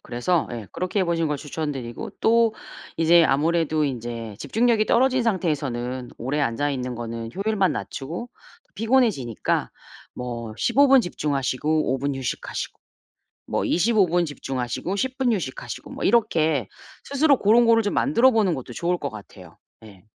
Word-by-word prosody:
그래서 155 +8 0
예, 115 -4 -6
그렇게 185 +3 -1
해 185 - +2
보시는 165 -2 0
걸 150 - -1
추천 150 +1 -4
드리고. 120 -4 -6
또 230 -1 +3 0.4
이제 165 +1 +5
아무래도 155 +2 +1
인제 115 -5 -5
집중력이 225 - +1
떨어진 255 +1 +3
상태에서는 135 - -2
오래 140 +5 -2
앉아 145 +3 0
있는 125 -2 -3
거는 115 -1 -5
효율만 200 -2 +1
낮추고 170 - -6 0.4
피곤해지니까 220 - +1 0.4
뭐 115 -3 -6
15 275 - +3
분 265 -2 +6
집중하시고 150 -1 -1
5 135 - -1
분 140 +1 -2
휴식하시고, 135 -2 -5 0.7
뭐 - - -1
25 205 +2 +3
분 175 +1 +1
집중하시고 135 - -4
10 260 +5 -2
분 255 -3 +2
휴식하시고. 155 -11 -5
뭐 - - -6
이렇게 160 - +2 0.4
스스로 280 0 +3
고런 230 +4 +5
거를 230 0 +5
좀 205 - -2
만들어 260 -2 +4
보는 215 -7 +2
것도 130 -4 -6
좋을 175 +4 -1
것 140 - -3
같아요. 95 -5 -13 0.3
예. 100 -4 -15
160 Hz, 325 characters per minute, -24 LUFS, -, 0.7 s, 분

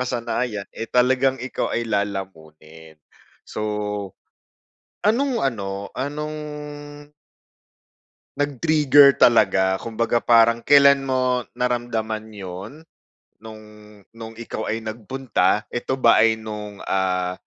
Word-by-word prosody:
nakasanayan, 120 -4 -3
eh, 115 - -6
talagang 130 +2 +2
ikaw 130 -1 -4
ay 120 - -1
lalamunin. 80 -7 -6 0.5
So, - - -7 1.4
anong 245 +5 +1
ano, 100 -6 -3
anong 150 +3 -4 2.0
nag-trigger 145 0 +4
talaga, 95 -5 +4
kumbaga 115 +1 -1
parang 115 0 +4
kailan 140 0 +6
mo 130 -2 0 0.2
naramdaman 115 -3 -2
'yon? 100 - -9 0.6
No'ng 110 -1 -11 0.5
no'ng 115 0 -10
ikaw 115 -1 -5
ay 115 +1 -3
nagpunta, 110 -2 -1
eto 130 +2 -2
ba 115 -3 +5
ay 110 0 +3
no'ng, 105 -2 -8
ah, 90 -1 0
115 Hz, 95 wpm, -22 LUFS, 105-130 Hz, 2.0 s, kailan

